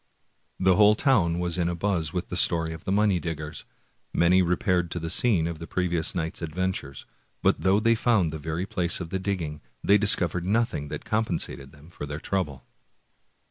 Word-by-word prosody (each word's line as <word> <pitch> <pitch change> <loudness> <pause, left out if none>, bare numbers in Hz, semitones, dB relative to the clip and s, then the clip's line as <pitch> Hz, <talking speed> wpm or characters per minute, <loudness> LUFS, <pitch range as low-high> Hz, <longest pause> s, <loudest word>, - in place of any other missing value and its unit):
The 95 -1 +3
whole 105 0 +6
town 100 - +2
was 90 0 -2
in 85 0 +1
a 85 - -2
buzz 85 -4 -1
with 90 +1 -4
the - - -4
story 80 -2 +2
of 80 - -11
the - - -2
money 100 -2 +2
diggers. 80 -2 -6 0.5
Many 90 +2 +4
repaired 90 0 +1
to 85 - -3
the 80 0 -4
scene 100 -10 +3
of 85 -1 -4
the 85 - -8
previous 85 -3 -1
night's 80 -1 -3
adventures; 80 -4 -3 0.4
but - - +2
though 95 +4 +3
they 115 +1 +3
found 110 -8 +2
the 80 - -5
very 80 +4 -3
place 90 -3 0
of 85 -2 -7
the 95 - -1
digging, 85 -6 -3 0.2
they 100 +1 +5
discovered 90 -5 +3
nothing 110 -8 0
that - - -7
compensated 90 -10 -2
them 75 +3 -17
for 75 - -7
their 75 +1 -5
trouble. 75 -8 -3
85 Hz, 190 wpm, -26 LUFS, 80-95 Hz, 0.5 s, whole